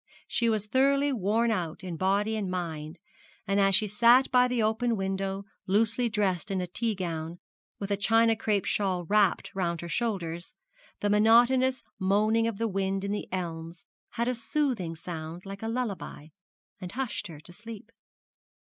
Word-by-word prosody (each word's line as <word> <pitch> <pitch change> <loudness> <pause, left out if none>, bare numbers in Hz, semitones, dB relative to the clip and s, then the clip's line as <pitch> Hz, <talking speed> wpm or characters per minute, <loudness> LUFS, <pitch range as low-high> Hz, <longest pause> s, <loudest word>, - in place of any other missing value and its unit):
She 235 -1 +1
was 215 -2 0
thoroughly 275 +4 +2
worn 225 +2 +1
out 175 -2 -3
in 180 -2 -5
body 200 +5 +1
and 205 -3 -2
mind, 165 -3 -4 0.5
and 200 +1 +1
as 195 -1 +4
she 215 - +4
sat 235 +5 +4
by 250 -1 +5
the 245 -3 0
open 225 +2 +1
window 195 0 -2 0.2
loosely 225 +5 +2
dressed 200 -5 0
in 195 -1 -1
a 180 - -1
tea 220 +5 -2
gown, 165 -2 -4 0.4
with 200 0 -5
a 200 - +2
china 225 +2 +4
crape 210 -3 0
shawl 185 -4 0
wrapped 205 0 +2
round 170 -3 -1
her 170 - -6
shoulders, 175 -7 -2 0.5
the 205 - +1
monotonous 240 +4 +4 0.2
moaning 215 +4 +2
of 230 -3 -3
the 230 - 0
wind 195 -1 -1
in 200 - -2
the 205 - -3
elms 170 -2 -5 0.3
had 235 +1 -1
a 250 - +1
soothing 230 - -1
sound 165 +1 -7
like 195 0 -8
a 225 - -3
lullaby, 215 -10 -4 0.5
and 180 -2 -7
hushed 260 -4 -3
her 160 -4 -10
to 175 +3 -13
sleep. 215 +2 -10
205 Hz, 170 wpm, -28 LUFS, 180-230 Hz, 0.5 s, by